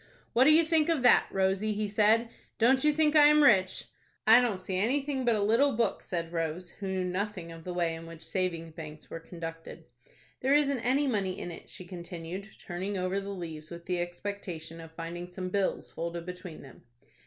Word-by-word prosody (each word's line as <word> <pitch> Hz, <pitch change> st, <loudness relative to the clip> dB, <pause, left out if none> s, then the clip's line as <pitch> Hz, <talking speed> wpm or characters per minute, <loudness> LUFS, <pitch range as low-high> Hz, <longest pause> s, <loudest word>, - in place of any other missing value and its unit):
"What 250 Hz, +3 st, +5 dB
do 305 Hz, -, +7 dB
you 320 Hz, +2 st, +6 dB
think 320 Hz, 0 st, +2 dB
of 315 Hz, -6 st, +1 dB
that, 245 Hz, -, +6 dB
Rosie?" 195 Hz, +2 st, +1 dB
he 210 Hz, 0 st, -1 dB
said. 220 Hz, +3 st, +3 dB, 0.3 s
"Don't 260 Hz, +3 st, +4 dB
you 300 Hz, -, +5 dB
think 305 Hz, 0 st, +2 dB
I 295 Hz, -1 st, +8 dB
am 300 Hz, 0 st, +6 dB
rich?" 190 Hz, -8 st, +4 dB, 0.4 s
"I 225 Hz, +3 st, +8 dB
don't 235 Hz, -6 st, 0 dB
see 185 Hz, 0 st, -3 dB
anything 265 Hz, +5 st, 0 dB
but 235 Hz, -2 st, +3 dB
a 205 Hz, -, 0 dB
little 240 Hz, +7 st, +3 dB
book," 225 Hz, -2 st, 0 dB
said 170 Hz, -1 st, -4 dB
Rose, 165 Hz, +2 st, -3 dB
who 200 Hz, -, -7 dB
knew 190 Hz, -1 st, -1 dB
nothing 180 Hz, -1 st, -3 dB
of 165 Hz, 0 st, -10 dB
the 180 Hz, -, -4 dB
way 170 Hz, -2 st, +1 dB
in 165 Hz, 0 st, -8 dB
which 165 Hz, -1 st, -10 dB
savings 170 Hz, -4 st, -2 dB
banks 155 Hz, -1 st, -10 dB
were 165 Hz, -, -5 dB
conducted. 165 Hz, -1 st, -8 dB, 0.5 s
"There 270 Hz, +2 st, +3 dB
isn't 280 Hz, -3 st, +2 dB
any 260 Hz, +5 st, +2 dB
money 200 Hz, -8 st, -1 dB
in 175 Hz, -, -5 dB
it," 165 Hz, -, -11 dB
she 185 Hz, -, -9 dB
continued, 175 Hz, +2 st, -7 dB
turning 190 Hz, +3 st, -4 dB
over 185 Hz, +2 st, -1 dB
the 200 Hz, -, -7 dB
leaves 165 Hz, -5 st, -6 dB
with 170 Hz, 0 st, -9 dB
the 180 Hz, -1 st, -1 dB
expectation 175 Hz, -3 st, -6 dB
of 165 Hz, 0 st, -11 dB
finding 170 Hz, +2 st, -6 dB
some 185 Hz, +1 st, -5 dB
bills 195 Hz, 0 st, -1 dB
folded 170 Hz, 0 st, -4 dB
between 180 Hz, -2 st, -8 dB
them. 135 Hz, -3 st, -14 dB
190 Hz, 205 wpm, -29 LUFS, 170-230 Hz, 0.5 s, I